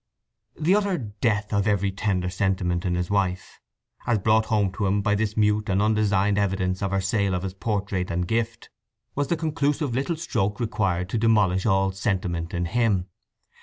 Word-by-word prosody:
The 165 +5 +3
utter 200 -3 +1
death 105 -3 -2
of 100 0 +1
every 100 -1 +1
tender 95 -2 -1
sentiment 95 -1 0
in 90 -1 0
his 90 +1 -2
wife, 95 -2 -1 0.5
as 120 - +3
brought 110 +2 +3
home 105 -3 +1
to 100 +1 -2
him 100 +1 +1
by 105 - +2
this 105 +1 -1
mute 105 -1 +2
and 95 0 +2
undesigned 105 -1 +2
evidence 95 -2 0
of 100 - 0
her 95 +1 0
sale 100 -1 0
of 90 - -3
his 95 -1 -4
portrait 100 -2 -2
and 90 +1 -1
gift, 115 +1 -2 0.4
was 145 0 -1
the 170 - 0
conclusive 150 -3 -1
little 140 +7 -1
stroke 115 - -2
required 100 -6 -1
to 115 - -1
demolish 105 -4 +3
all 95 -1 +2
sentiment 95 -4 -2
in 90 0 -1
him. 100 -1 +1
100 Hz, 180 wpm, -25 LUFS, 95-110 Hz, 0.5 s, The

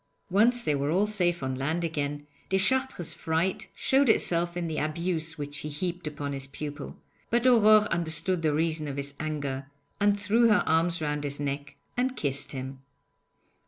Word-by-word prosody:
Once 235 +5 +4
they 150 - +1
were 140 0 0
all 185 +6 +3
safe 175 -7 +1
on 130 0 -1
land 155 +6 -1
again, 145 -3 -2 0.2
Deschartres' 190 - +1
fright 165 +4 -1
showed 270 -1 +3
itself 175 -4 +1
in 175 -1 -2
the 160 -1 -2
abuse 160 +1 -2
which 145 -1 -5
he 150 - -5
heaped 175 +3 -3
upon 145 -1 -4
his 135 -1 -5
pupil, 145 +1 -7 0.3
but 240 +1 +1
Aurore 215 -4 +6
understood 170 +1 -1
the 155 -2 +2
reason 155 0 0
of 140 -1 -5
his 140 0 -5
anger, 145 -3 -3 0.3
and 205 0 +3
threw 225 +4 +3
her 210 - +4
arms 165 0 +2
round 150 -1 -1
his 145 0 -3
neck 140 0 -4 0.2
and 255 +1 0
kissed 140 -1 -2
him. 130 0 -6
160 Hz, 170 wpm, -28 LUFS, 145-190 Hz, 0.3 s, Aurore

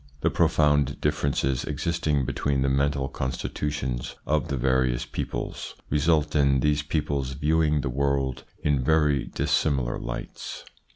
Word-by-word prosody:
The - - +2
profound 75 -2 +2
differences 70 -3 0
existing 75 -2 0
between 70 +1 0
the 70 - +2
mental 70 0 +1
constitutions 65 -1 -3
of 75 -1 +1
the 70 - -2
various 65 -1 +1
peoples - - -5 0.2
result 75 +1 +2
in 70 -2 +4
these 75 +1 +2
peoples 75 -3 -1
viewing 75 +1 +2
the 70 - -3
world 65 -1 0 0.2
in 70 -3 +2
very 75 -2 +3
dissimilar 70 -5 0
lights. - - -6
70 Hz, 125 wpm, -26 LUFS, 65-75 Hz, 0.2 s, in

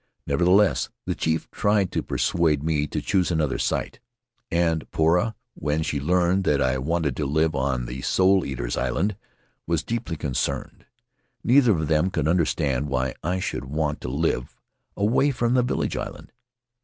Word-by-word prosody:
Nevertheless, 85 -4 +3 0.2
the - - -1
chief 80 0 -1
tried 100 -2 +1
to - - -1
persuade 80 -4 +1
me 75 -2 0
to - - -3
choose 95 -3 +1
another 75 -5 0
site; - - -2 0.5
and 85 -2 0
Poura, 90 +8 +2 0.2
when 75 +1 -1
she 75 -2 -2
learned 90 +5 +2
that 75 -5 +2
I 65 -1 +1
wanted 75 -1 -1
to 75 - -1
live 80 +3 +1
on 65 -3 -1
the 60 +2 -6
Soul 95 +3 +3
Eaters' - - -3
Island, 90 - 0 0.5
was 85 -2 0
deeply 115 -8 -3
concerned. 70 -4 -3 0.6
Neither 125 -2 +5
of 80 -4 -1
them 80 +4 +2
could 80 -5 -1
understand 75 -5 +1
why 65 -1 -1
I 90 +3 -1
should 90 - -3
want 75 +2 -2
to - - -4
live 70 -3 -1 0.4
away 115 +8 +3
from 120 -3 0
the 130 - +4
village 125 - -1
island. - - -6
80 Hz, 160 wpm, -24 LUFS, 70-90 Hz, 0.6 s, Neither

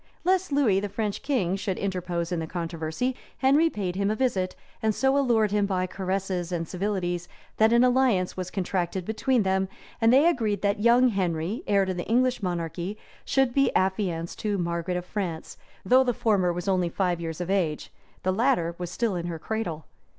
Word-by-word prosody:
Lest 375 -1 +1
Lewis, 240 -9 +3
the 205 - -3
French 205 0 -3
king, 230 -11 0
should 195 -1 -3
interpose 180 -3 -2
in 175 - 0
the 160 - -4
controversy, 165 +8 -3 0.2
Henry 285 +5 +4
paid 190 - -3
him 200 +1 0
a 215 - 0
visit; 200 -7 0 0.3
and 220 -2 +1
so 265 +3 +2
allured 235 -7 +3
him 205 -1 +2
by 185 -2 0
caresses 185 -1 -3
and 165 -2 -2
civilities, 180 -2 -2 0.3
that 220 +1 +5
an 235 +1 +5
alliance 250 -7 +2
was 185 -1 -4
contracted 185 -1 -2
between 230 +2 +1
them; 190 0 +1 0.3
and 225 0 +5
they 275 +6 +6
agreed 220 - 0
that 200 0 +1
young 240 +3 +5
Henry, 185 - -1
heir 200 -1 +3
to 190 - -2
the 175 -1 -5
English 250 +1 +2
monarchy, 175 +2 -3 0.3
should 270 -3 +2
be 275 -1 +3
affianced 185 -3 -1
to 210 -2 -1
Margaret 170 0 -2
of 180 - -5
France, 180 -5 -4 0.3
though 255 +7 +6
the 245 -3 0
former 195 -6 +2
was 175 +3 -5
only 185 -3 +2
five 175 -1 -1
years 165 -1 -5
of 180 +1 -3
age; 170 -6 -1 0.3
the 185 - +1
latter 190 -7 +1
was 175 -1 -4
still 215 +2 -1
in 175 0 -3
her 170 -2 -4
cradle. 170 -4 -4
195 Hz, 190 wpm, -26 LUFS, 175-230 Hz, 0.3 s, they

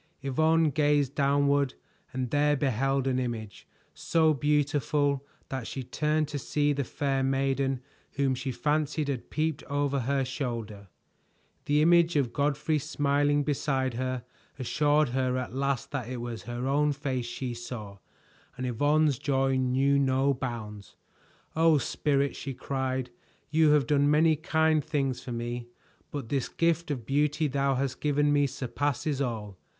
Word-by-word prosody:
Yvonne 160 +3 +3
gazed 145 -1 +2
downward 140 -1 +2 0.4
and 130 -2 -3
there 145 0 +3
beheld 135 0 0
an 130 -1 +1
image, 115 -4 -5 0.3
so 160 -2 +2
beautiful 145 0 +1 0.3
that 130 -4 -4
she 135 - -5
turned 150 +4 0
to 145 -1 -4
see 145 +1 +1
the 140 0 -1
fair 135 +1 -1
maiden 135 0 0 0.3
whom 140 -2 +1
she 130 +1 -3
fancied 150 +2 0
had 130 -4 -4
peeped 155 -1 -1
over 145 -1 0
her 135 +2 0
shoulder. 115 -7 -5 0.8
The 150 +1 +3
image 170 0 +4
of 135 -5 +1
Godfrey 150 +2 +1
smiling 145 0 +1
beside 135 -3 0
her 130 0 -3 0.3
assured 145 +2 +2
her 130 0 0
at 125 -2 -4
last 140 0 -1
that 130 -5 -4
it 130 - -4
was 120 -2 -5
her 120 +2 -4
own 145 +2 +2
face 135 -4 -3
she 125 +1 -4
saw, 115 -4 -7 0.6
and 130 - -3
Yvonne's 145 +3 +2
joy 135 -2 +1
knew 130 +2 +2
no 135 +1 +2
bounds. 110 -6 -6 0.6
"Oh, 160 -1 +5
Spirit!" 140 +2 0
she 135 -2 -6
cried. 130 -1 -2 0.4
"You 155 0 +4
have 145 -3 +3
done 145 +2 +3
many 155 +2 +4
kind 160 0 +2
things 135 -4 -1
for 125 - -6
me, 120 0 -4 0.4
but 140 -6 -6
this 135 -3 -1
gift 170 0 0
of 130 -6 -3
beauty 150 +4 +1
thou 140 0 +1
hast 135 0 -2
given 145 0 +2
me 145 -1 +3
surpasses 145 +3 -2
all! 110 -7 -4
140 Hz, 150 wpm, -28 LUFS, 130-145 Hz, 0.8 s, Oh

